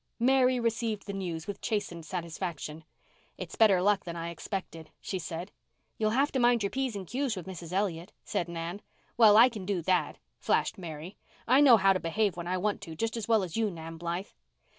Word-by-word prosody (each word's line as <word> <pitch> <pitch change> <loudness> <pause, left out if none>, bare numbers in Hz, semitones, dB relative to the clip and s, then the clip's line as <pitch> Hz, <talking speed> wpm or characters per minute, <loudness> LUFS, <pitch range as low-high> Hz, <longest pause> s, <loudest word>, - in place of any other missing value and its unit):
Mary 255 +1 +3
received 225 -3 -1
the 200 - -5
news 175 -5 -4
with 205 - -6
chastened 175 -6 -2
satisfaction. 165 -2 -5 0.5
"It's - - -7
better 195 -5 +5
luck 205 0 +3
than 170 -1 -6
I 170 0 -4
expected," 170 -3 -6
she 190 - -4
said. 170 +3 -6 0.5
"You'll 215 -1 +2
have 270 +6 +2
to 265 - 0
mind 240 -2 +4
your 200 - -1
p's 265 -4 -2
and 195 -2 -5
q's 255 +3 -1
with 185 - -7
Mrs. 180 -3 -8
Elliott," 185 -3 -1
said 175 - -2
Nan. 170 +3 -5 0.3
"Well, 215 -3 +7
I 235 +3 +9
can 220 -6 -6
do 185 -3 -2
that," 185 +1 +1 0.2
flashed - - 0
Mary. 165 +1 -8 0.3
"I 260 +4 +6
know 260 -5 +8
how 195 -1 +4
to 185 - -1
behave 200 +4 0
when 175 0 -6
I 185 +1 0
want 205 +2 -1
to 165 -5 -8
just 225 +6 -2
as 225 -3 -4
well 220 -3 +4
as 175 -3 -5
you, 225 -1 +1
Nan 165 -2 -8
Blythe." 170 +4 -4
195 Hz, 205 wpm, -29 LUFS, 170-225 Hz, 0.5 s, I